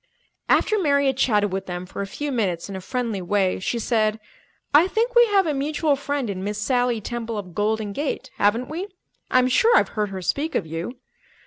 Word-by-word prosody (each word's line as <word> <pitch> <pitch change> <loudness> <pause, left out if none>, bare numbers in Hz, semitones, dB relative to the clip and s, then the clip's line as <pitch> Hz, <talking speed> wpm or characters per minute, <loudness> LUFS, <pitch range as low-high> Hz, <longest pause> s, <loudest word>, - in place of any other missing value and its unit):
After 430 -1 +3
Mary 280 -5 +2
had 265 -1 +2
chatted 210 -6 +2
with 195 - -3
them 180 0 -5
for 190 - -6
a 200 - -3
few 290 +8 -4
minutes 190 -9 -1
in 200 - -7
a 190 - -5
friendly 230 -1 -3
way, 190 +1 +1
she 215 +5 -2
said, 220 -2 +1 0.5
"I 310 +5 +7
think 460 +5 0
we 480 -1 +6
have 400 -3 +3
a 310 - 0
mutual 295 +2 0
friend 280 -2 -2
in 190 -2 -4
Miss 205 +1 -3
Sally 245 +1 +1
Temple 230 +1 -4
of 185 -4 -7
Golden 210 +1 -1
Gate, 285 +5 -3
haven't 225 +5 +2
we? 345 +6 -4 0.4
I'm 255 0 +4
sure 450 - +4
I've - - +3
heard 210 -2 -2
her 190 -1 -6
speak 285 - -1
of 185 - 0
you." 165 +10 -5
235 Hz, 210 wpm, -23 LUFS, 200-285 Hz, 0.5 s, I